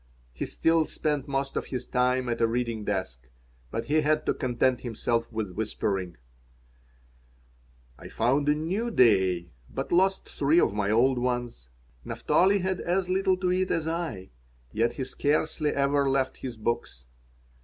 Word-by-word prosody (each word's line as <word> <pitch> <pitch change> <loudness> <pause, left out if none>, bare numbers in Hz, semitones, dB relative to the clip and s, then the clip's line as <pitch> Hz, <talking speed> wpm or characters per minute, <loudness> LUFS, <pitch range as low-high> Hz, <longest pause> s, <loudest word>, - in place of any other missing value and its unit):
He - - -4
still 165 -1 +2
spent 150 -3 -2
most 135 0 -2
of - - -2
his 125 -2 -4
time 125 0 +1
at 120 -1 -2
a 115 - +4
reading 115 -2 -2
desk, 65 -12 -4 0.4
but - - -3
he 155 +2 +2
had 155 +1 +1
to - - +2
content 130 -1 0
himself 115 0 -2
with 110 -4 -3
whispering 95 -3 -2 1.8
I - - -9
found 140 +5 +1
a 150 - +4
new 185 +10 -2
"day," 95 - +3 0.2
but - - -5
lost 190 +2 +2
three 150 +4 +2
of 115 - +2
my 105 -1 -1
old 125 +4 +3
ones. 120 - -3 0.3
Naphtali 195 +2 +2
had 185 0 -1
as 180 +1 0
little 190 0 +2
to 180 -1 0
eat 185 +1 +1
as 160 -1 0
I, 160 - -4 0.4
yet 115 +2 +1
he 135 - -4
scarcely 150 +3 0
ever 140 0 +1
left 135 -1 0
his 125 -4 -6
books. 105 - -3
130 Hz, 155 wpm, -27 LUFS, 115-155 Hz, 1.8 s, a